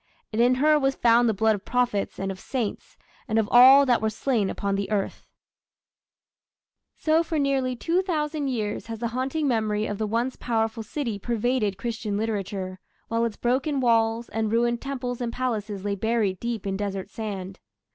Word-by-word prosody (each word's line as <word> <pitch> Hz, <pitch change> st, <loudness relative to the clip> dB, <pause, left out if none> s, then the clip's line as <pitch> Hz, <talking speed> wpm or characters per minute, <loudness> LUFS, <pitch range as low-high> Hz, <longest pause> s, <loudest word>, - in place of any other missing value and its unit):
And 220 Hz, -, +2 dB
in 250 Hz, +1 st, +4 dB
her 300 Hz, +3 st, +4 dB
was 270 Hz, -1 st, +1 dB
found 235 Hz, 0 st, +4 dB
the -, -, +2 dB
blood 220 Hz, +2 st, +3 dB
of 205 Hz, -1 st, -5 dB
prophets, 245 Hz, -5 st, 0 dB
and 195 Hz, 0 st, -2 dB
of 190 Hz, -, -8 dB
saints, 235 Hz, -3 st, -4 dB, 0.3 s
And 220 Hz, -2 st, 0 dB
of 220 Hz, -2 st, +2 dB
all 265 Hz, +3 st, +9 dB
that 245 Hz, -3 st, +2 dB
were 220 Hz, -, +1 dB
slain 220 Hz, -2 st, 0 dB
upon 200 Hz, 0 st, -2 dB
the 195 Hz, 0 st, -2 dB
earth. 205 Hz, -2 st, -2 dB, 1.7 s
So 315 Hz, +1 st, +3 dB
for 325 Hz, -1 st, -2 dB
nearly 270 Hz, -3 st, +1 dB
two 335 Hz, +9 st, +1 dB
thousand 305 Hz, -5 st, -2 dB
years 220 Hz, -6 st, -3 dB
has 225 Hz, -1 st, -5 dB
the 235 Hz, +1 st, -2 dB
haunting 265 Hz, +5 st, -1 dB
memory 215 Hz, -3 st, 0 dB
of 205 Hz, -1 st, -4 dB
the 215 Hz, -, 0 dB
once 235 Hz, +4 st, -1 dB
powerful 225 Hz, -1 st, -1 dB
city 230 Hz, -2 st, -4 dB
pervaded 230 Hz, -2 st, 0 dB
Christian 220 Hz, -2 st, -3 dB
literature, 195 Hz, -3 st, -3 dB, 0.3 s
while 230 Hz, 0 st, +1 dB
its 225 Hz, -3 st, -4 dB
broken 270 Hz, +4 st, 0 dB
walls 230 Hz, -1 st, +2 dB
and 220 Hz, -1 st, -1 dB
ruined 235 Hz, +1 st, +1 dB
temples 250 Hz, -3 st, -4 dB
and 235 Hz, -1 st, -2 dB
palaces 215 Hz, -6 st, -3 dB
lay 205 Hz, -, 0 dB
buried 210 Hz, -2 st, 0 dB
deep 235 Hz, -4 st, -3 dB
in 195 Hz, -1 st, -2 dB
desert 195 Hz, -1 st, -4 dB
sand. 195 Hz, -4 st, -6 dB
230 Hz, 180 wpm, -25 LUFS, 210-255 Hz, 1.7 s, all